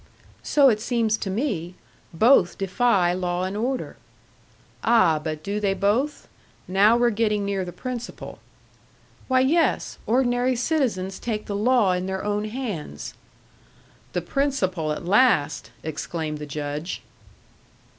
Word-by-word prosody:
"So 285 -2 +4
it 215 -3 0
seems 230 -2 +1
to 200 - -4
me. 190 - -2 0.4
Both 185 0 +4
defy 195 -2 +2
law 180 0 -1
and 190 +2 -3
order." 250 +5 -2 0.9
"Ah, 220 -9 +4
but 155 -1 -4
do 200 +3 -2
they 200 -2 0
both? 220 +10 0 0.4
Now 205 +5 +4
we're 240 0 +3
getting 210 -2 0
near 200 -1 -1
the 180 - -6
principle." 245 +4 -7 0.9
"Why, 260 -1 +3
yes. 320 +6 +1
Ordinary 245 +1 +2
citizens 235 - -1
take 215 -3 -3
the 200 - -4
law 220 -1 +3
in 180 +1 -1
their 190 0 -3
own 210 0 -1
hands." 215 - -5 1.0
"The - - 0
principle 190 - -1
at 150 - -4
last!" 175 - +3
exclaimed 155 0 -4
the 150 - -6
Judge. 145 +3 -4
205 Hz, 130 wpm, -24 LUFS, 180-245 Hz, 1.0 s, So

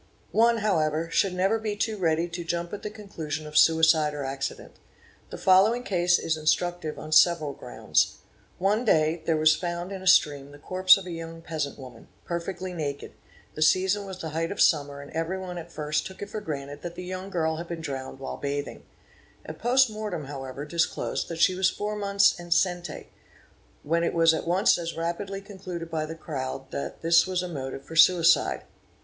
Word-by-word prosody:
One, 230 +1 +4
however, 165 -5 0
should 190 0 +1
never 195 +5 +1
be 215 -1 -3
too 220 +1 -1
ready 165 -3 +1
to 175 0 -6
jump 170 +1 -3
at 205 - -5
the - - -4
conclusion 170 -8 -6
of 150 0 -10
suicide 160 -2 +4
or 145 - -4
accident. 135 +1 -5 0.5
The - - -7
following 200 +6 +4
case 175 -4 +2
is 160 - -1
instructive 160 +1 -1
on 155 - -8
several 155 -2 +4
grounds. - - 0 0.4
One 205 +5 +1
day 160 -6 +2
there 165 -2 +2
was 155 0 +5
found 175 +1 -4
in 190 -1 -6
a 190 - -6
stream 145 -5 +4
the 145 - -13
corpse 185 +5 +5
of 195 - -8
a 180 - -6
young 165 0 -7
peasant 150 -4 -4
woman, 130 -2 -12 0.2
perfectly 180 +1 -4
naked; 145 -4 -4 0.4
the 155 - -7
season 190 +5 +3
was 190 -1 -7
the 160 - -5
height 165 +3 -2
of 200 - -6
summer 145 -3 +2
and 140 - -12
everyone 180 +2 -3
at 170 0 -10
first 150 -1 -2
took 190 +1 -9
it 205 - -9
for 215 - -4
granted 145 -5 -6
that 175 -1 -7
the 180 - -7
young 185 +1 -6
girl 160 -4 -1
had 170 +1 -6
been 170 -1 -5
drowned 135 -4 -5
while 135 0 -6
bathing. 145 0 -4 0.6
A - - -6
post 255 +3 +3
mortem 210 -8 -4
however 135 0 -7
disclosed 170 +2 -1
that 165 -1 -5
she 185 - +5
was 185 0 +2
four 210 +1 -4
months 200 -1 +3
enceinte, 175 -1 -1 0.8
when 165 +3 +1
it 170 - -1
was 165 -1 +5
at 160 - -3
once 180 +1 +3
as 165 -1 -5
rapidly 195 +4 -3
concluded 185 -4 -8
by 155 -1 -2
the 160 - -6
crowd 135 -4 -6
that 140 - -5
this 170 +1 +5
was 185 -1 -1
a - - -3
motive 135 -4 -6
for 165 - -9
suicide. 170 0 +5
170 Hz, 195 wpm, -26 LUFS, 155-185 Hz, 0.8 s, was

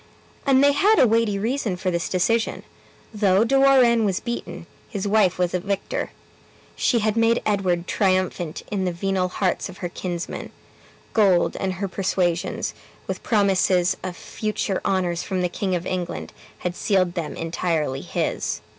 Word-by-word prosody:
And 270 0 +5
they 285 - +6
had 405 +10 +4
a - - +7
weighty 225 -3 +2
reason 225 -1 -1
for 185 0 -1
this 170 -1 -2
decision: 220 +5 0 0.5
though 205 -1 +3
De 235 - -1
Warenne 255 -4 +5
was 195 -2 +1
beaten, 235 -1 -5 0.2
his 205 -2 -3
wife 200 -3 +3
was 180 -1 0
a 180 - +1
victor. 200 +2 -3 0.7
She 245 - +2
had 215 -1 +1
made 230 +1 +3
Edward 185 -4 +1
triumphant 185 -4 0
in 195 -2 -1
the 180 - 0
venal 185 +1 0
hearts 185 +1 -1
of 185 - -11
her 175 - -4
kinsmen; 175 0 -5 0.6
gold 195 -5 +3
and 190 -1 -1
her 195 +2 -3
persuasions, 180 -2 -1 0.3
with - - -4
promises 190 -4 +2
of 180 -2 -5
future 210 -3 -3
honors 180 -3 0
from 185 -2 -2
the 180 - +1
King 185 +1 -1
of 175 0 -3
England, 180 -1 -4 0.2
had 180 -1 -3
sealed 185 -4 +1
them 170 -4 -4
entirely 165 -4 -1
his. - - -2
190 Hz, 160 wpm, -23 LUFS, 180-215 Hz, 0.7 s, a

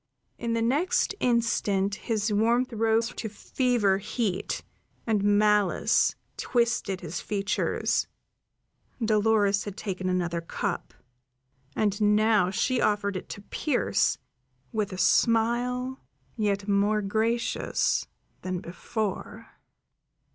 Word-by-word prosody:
In 235 -1 -2
the 230 0 +1
next 295 - +1
instant 215 -5 +1
his 215 0 -1
warmth 235 +4 +2
rose 225 +1 +2
to 220 - -5
fever 215 -2 +1
heat, 205 -2 -2 0.4
and 215 -3 +1
malice 205 -2 +3 0.2
twisted 235 -6 0
his 175 -1 -5
features; 200 0 0 0.9
Dolores 215 -2 +2
had 205 -1 -7
taken 185 -3 -3
another 175 -2 -1
cup, 165 - -4 0.8
and 205 -1 0
now 210 -2 +4
she 245 +6 0
offered 205 -1 +1
it 185 - -6
to 205 - -8
Pearse, 280 +4 0 0.5
with 210 -2 -1
a 185 - -6
smile 245 +5 +2 0.4
yet 205 -2 -1
more 205 +1 +2
gracious 225 +4 0 0.3
than 185 -1 -3
before. 210 +4 -5
210 Hz, 105 wpm, -27 LUFS, 200-230 Hz, 0.9 s, now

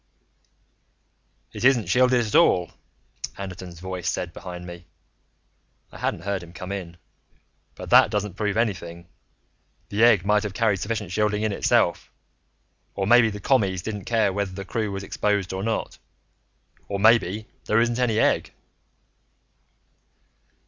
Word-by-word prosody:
"It - - -6
isn't 125 -4 +4
shielded 125 -1 +3
at 105 - -6
all," 90 -1 +4 0.7
Anderton's 90 -3 -8
voice 90 -1 -4
said 85 -2 -3
behind 90 -1 -8
me. 85 -1 -10 1.0
I - - -12
hadn't - - -2
heard 100 -1 -2
him 85 0 -13
come 90 +3 -7
in. 90 -4 -6 0.8
"But - - -9
that - - +7
doesn't 105 -2 -2
prove 105 +1 -2
anything. 85 -7 -2 0.8
The 105 +3 +1
egg 110 -6 +5
might 105 0 +3
have 105 -2 -5
carried 110 -4 +2
sufficient 105 -1 -4
shielding 105 +1 0
in 110 - 0
itself. 100 - +1 0.8
Or 95 - -1
maybe 120 +2 +5
the 105 -1 -7
Commies 100 -6 +1
didn't 105 -3 -5
care 110 -4 +1
whether 100 -1 -2
the 100 +1 -7
crew 110 0 -2
was 95 0 -5
exposed 100 -1 -1
or 95 - -3
not. 110 +2 -3 0.9
Or 100 - -3
maybe 110 -1 +3 0.2
there 110 - +2
isn't 120 +1 +1
any 120 -4 +1
egg." - - +2
100 Hz, 140 wpm, -24 LUFS, 95-110 Hz, 1.0 s, that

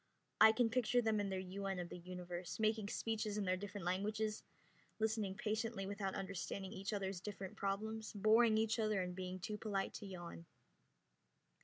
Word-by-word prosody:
I 220 - +10
can 225 0 +2
picture 245 0 +3
them 220 -1 +3
in 205 -1 0
their 190 - -1
UN 190 +1 -3
of 175 -1 -3
the - - -6
Universe, 180 0 -5
making 215 -1 +2
speeches 215 -1 -1
in 205 - 0
their 185 0 +3
different 195 -1 -5
languages, 210 +4 0 0.6
listening 215 -3 0
patiently 215 0 -1
without 195 -1 -2
understanding 195 0 -3
each 195 +1 -3
other's 195 -3 -2
different 200 0 -6
problems, 215 +2 -2
boring 220 +2 +5
each 220 +1 +2
other 215 -2 +2
and 180 0 -3
being 185 0 -4
too 210 +4 -4
polite 200 -3 -1
to 205 - -6
yawn. 175 -3 -7
200 Hz, 170 wpm, -39 LUFS, 190-220 Hz, 0.6 s, I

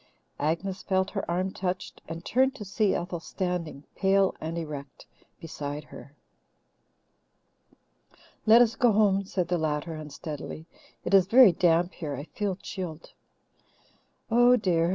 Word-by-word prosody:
Agnes 175 +6 -2
felt 190 0 0
her 195 - -4
arm 185 +2 0
touched, 185 0 -4
and 165 +1 -7
turned 265 +2 +2
to 210 - -8
see 200 +1 +1
Ethel 175 0 -3
standing, 170 -4 -4
pale 195 0 +3
and 160 +2 -4
erect, 145 -4 -7 0.3
beside 150 -3 -6
her. 145 0 -13 2.3
"Let 230 +3 +8
us 225 -1 -1
go 235 -1 +3
home," 200 -2 +3
said 185 -2 -2
the 175 -1 +1
latter 155 +1 -2
unsteadily. 155 0 -7 0.4
"It 180 - -2
is 190 -2 +6
very 240 -1 +8
damp 175 +1 +2
here 150 -4 -5
I 140 - -6
feel 195 +4 -3
chilled." 175 -4 -7 1.2
"Oh, 245 +2 +6
dear!" 175 -7 +1
180 Hz, 135 wpm, -27 LUFS, 160-195 Hz, 2.3 s, Let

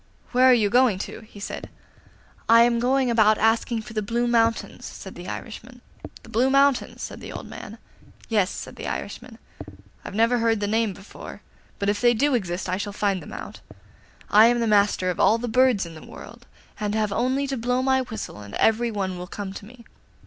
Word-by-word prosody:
'Where 255 +1 +4
are - - +8
you 210 -4 +2
going 245 -5 +4
to?' 195 - -6
he 215 -2 -14
said. 200 - -6 0.8
'I 230 +1 +8
am 235 0 +2
going 255 +1 +2
about 215 -2 +4
asking 225 +1 +1
for 215 - -11
the 215 - -1
Blue 235 +4 -1
Mountains,' 230 -1 +1
said - - -9
the - - -10
Irishman. - - -8 0.4
'The - - -14
Blue 250 +4 +2
Mountains?' 275 -1 +2
said - - -7
the - - -8
old - - -7
man. - - -9 0.5
'Yes,' 205 -5 +2
said - - -8
the - - -6
Irishman. - - -6 0.7
'I - - -6
never 230 +4 +2
heard 225 -1 +2
the 205 - -1
name 220 0 0
before; 195 +3 -11 0.3
but 200 - -2
if 205 0 0
they 240 -1 +4
do 280 +5 +2
exist 185 -6 -2
I 180 +1 -1
shall 205 0 -4
find 200 -3 0
them - - -11
out. - - -8 0.7
I 215 +2 +7
am 235 -1 +2
master 200 -3 +3
of 175 - -7
all 220 - +4
the 245 +1 -4
birds 245 -4 +3
in 165 - -9
the 155 - -11
world, 235 +1 -12 0.3
and 210 0 -2
have 215 -2 0
only 260 +5 0
to 275 -1 -3
blow 250 +1 0
my 265 0 +3
whistle 220 - -7
and 100 -1 -9
every 230 +2 +2
one 190 -4 -3
will 180 - -7
come 195 0 -6
to 200 - -9
me. 235 0 -15
225 Hz, 205 wpm, -24 LUFS, 205-240 Hz, 0.8 s, are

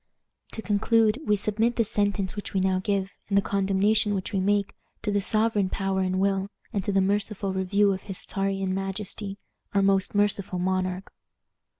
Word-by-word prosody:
"To 220 - -6
conclude, 220 +2 +2
we 210 - +4
submit 220 +4 0
this 230 -3 +1
sentence 200 -2 0
which 205 -1 -6
we - - +3
now 190 0 +2
give, 195 -1 0 0.2
and 200 - +2
the - - +5
condemnation 200 +2 +2
which 190 +3 -4
we 195 - +1
make, 200 +1 +1 0.3
to 210 - 0
the 205 0 +1
sovereign 215 -1 +2
power 195 0 -1
and 185 0 0
will, 195 0 +1 0.2
and 200 -3 -1
to 205 - 0
the 195 0 +3
merciful 200 0 0
review 200 +2 +2
of 190 - -5
his 195 -3 -5
Czarian 195 -1 -1
majesty, 195 +1 -4 0.4
our 200 - +4
most 195 0 +2
merciful 200 -2 +1
monarch." 185 +1 -2
200 Hz, 180 wpm, -26 LUFS, 190-205 Hz, 0.4 s, the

